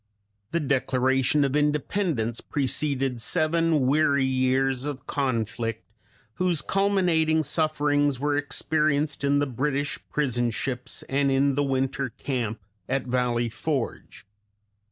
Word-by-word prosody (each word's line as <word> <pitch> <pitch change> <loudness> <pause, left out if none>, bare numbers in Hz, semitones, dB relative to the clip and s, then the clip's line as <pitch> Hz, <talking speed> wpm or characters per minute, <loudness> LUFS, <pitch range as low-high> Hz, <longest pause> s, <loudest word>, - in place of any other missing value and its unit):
The 170 - 0
Declaration 130 0 +2
of 135 +1 -1
Independence 150 - 0
preceded 135 -3 -1
seven 160 -1 +1
weary 140 0 +3
years 130 0 +1
of 145 -3 -5
conflict, 115 -4 -2 0.5
whose 175 -6 +1
culminating 175 -6 +2
sufferings 145 -2 +1
were 145 +1 +1
experienced 145 0 0
in 140 0 +3
the 145 - +2
British 140 +2 -2
prison 120 -5 0
ships 125 +2 -4
and 140 +1 +1
in 135 +1 +3
the 145 - +1
winter 135 0 -1
camp 115 -2 -3 0.3
at 130 0 0
Valley 120 -1 0
Forge. 120 +1 -4
140 Hz, 115 wpm, -26 LUFS, 130-150 Hz, 0.5 s, weary